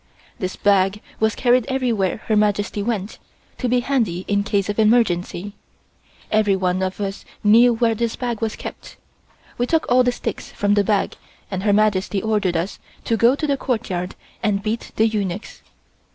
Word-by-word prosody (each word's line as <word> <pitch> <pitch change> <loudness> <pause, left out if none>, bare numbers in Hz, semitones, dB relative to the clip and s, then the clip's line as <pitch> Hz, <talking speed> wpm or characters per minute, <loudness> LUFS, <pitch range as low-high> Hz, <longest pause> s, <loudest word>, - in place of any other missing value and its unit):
This 185 -3 -3
bag 195 0 +2 0.2
was 220 0 +2
carried 245 -1 +3
everywhere 235 -8 0
Her 220 - +1
Majesty 205 0 +1
went, 210 -2 -3 0.4
to 250 - -1
be 245 0 +2
handy 225 -10 -1
in 200 0 +1
case 200 -2 0
of 205 +1 -2
emergency. 205 -4 +2 0.8
Everyone 190 -4 +2
of 190 +1 -2
us 195 -1 -4 0.2
knew 230 +3 +6
where 230 0 +2
this 230 +1 -2
bag 240 -3 -3
was 225 -1 -1
kept. - - -9 0.6
We 245 - +1
took 325 +2 +1
all 250 +1 +6
the 245 0 +3
sticks - - -5
from 205 0 +1
the 205 0 +3
bag 205 -1 0 0.3
and 190 -1 -2
Her 205 +1 +2
Majesty 205 -1 +2
ordered 200 -4 0
us 170 +4 -3 0.2
to 230 - +1
go 235 +4 +4
to 305 - -2
the 280 -2 +1
courtyard 190 -9 -2 0.3
and 200 -2 0
beat 225 +2 -3
the 220 - +4
eunuchs. 205 -2 -4
210 Hz, 170 wpm, -21 LUFS, 195-235 Hz, 0.8 s, knew